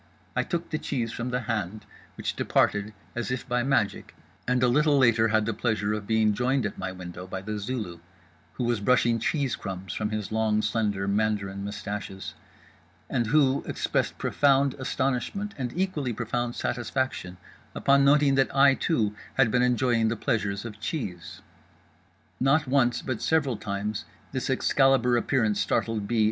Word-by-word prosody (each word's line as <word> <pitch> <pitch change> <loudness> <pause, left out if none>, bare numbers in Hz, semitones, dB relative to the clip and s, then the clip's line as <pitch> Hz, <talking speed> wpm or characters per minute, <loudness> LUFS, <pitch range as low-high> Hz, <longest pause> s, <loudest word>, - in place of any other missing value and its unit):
I - - +3
took 170 -1 -3
the 155 - -1
cheese 120 -5 -2
from 120 +2 -4
the 125 +1 -1
hand, 105 -3 -3 0.3
which - - -3
departed 105 +1 +1 0.2
as 120 +1 -2
if 125 0 -3
by 125 0 +1
magic; 125 -5 0 0.3
and 125 0 +2
a - - +5
little 145 +3 +3
later 115 -4 +4
had 110 -1 +2
the 115 - -1
pleasure 105 -2 0
of 105 -1 -4
being 110 -1 +3
joined 125 +3 +1
at 100 - -4
my 95 0 -3
window 90 0 -8
by 95 +1 -5
The 105 +1 -4
Zulu, 105 -6 -4 0.5
who 125 - -3
was 120 -2 +1
brushing 115 +1 +3
cheese 135 +2 0
crumbs 95 -2 -6
from 105 -1 -2
his 105 -1 -4
long 110 -1 +1
slender 105 -2 0
Mandarin 100 -1 0
mustaches, 100 -1 -5 0.8
and 120 -3 +1
who 140 0 +3
expressed - - -1
profound 140 -1 +3
astonishment 135 - -2
and 125 -3 -3
equally 165 -9 -1
profound 120 +2 -2
satisfaction 120 -7 -2 0.4
upon 140 0 +4
noting 140 0 +5
that 135 0 +3
I 135 0 +7
too 110 -8 0 0.2
had 130 -4 +4
been 125 - +3
enjoying 125 -2 +2
the 115 - 0
pleasures 105 -4 -1
of 110 -2 -8
cheese. 100 - -5 1.0
Not 140 +4 +3
once, 130 -2 +2
but 130 -4 -3
several 145 -6 +1
times, 105 +1 -4 0.3
this 130 0 -3
Excalibur 130 -2 +3
appearance 110 -4 +1
startled 105 +1 0
B. 120 0 0
115 Hz, 160 wpm, -27 LUFS, 105-130 Hz, 1.0 s, I